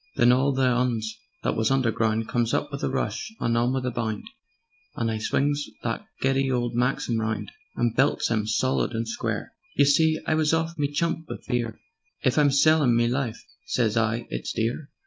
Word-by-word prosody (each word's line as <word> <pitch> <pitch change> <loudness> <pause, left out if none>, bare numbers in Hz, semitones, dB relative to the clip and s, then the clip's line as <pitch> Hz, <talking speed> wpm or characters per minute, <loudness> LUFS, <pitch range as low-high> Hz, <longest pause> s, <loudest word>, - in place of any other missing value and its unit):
"Then 120 +1 +5
all 130 +3 +3
the 135 0 0
'Uns 120 -3 0 0.3
that - - 0
was 110 0 +1
underground, 115 -4 +1
Comes 120 -1 0
up 145 - -1
with 140 - -5
a - - +1
rush 215 - -2
and 115 - +1
on 120 +2 +2
with 130 -1 -1
a 125 - 0
bound, 110 -2 -3 0.7
And 115 -1 -1
I 110 - -2
swings 145 +6 0 0.2
that - - -3
giddy 135 0 +2
old 120 -1 0
Maxim 120 -1 0
round 110 -2 -2 0.2
And 120 -1 0
belts 135 -1 +2
'em 110 -2 0
solid 130 +3 +1
and 115 0 -2
square. 115 - -3 0.2
You 140 - +5
see 155 +3 +4
I - - +1
was 155 0 +3
off 165 +1 -1
me 145 -2 -1
chump 160 +1 -1
wiv - - -7
fear: 120 -3 -2 0.4
'If 130 +4 +3
I'm 145 -1 +5
sellin' 140 -2 +4
me 120 0 +3
life,' 120 -2 -2 0.2
sez 115 -3 +1
I, 115 +1 +1
'it's - - -3
dear.' 120 +7 -2
125 Hz, 195 wpm, -25 LUFS, 115-140 Hz, 0.7 s, Then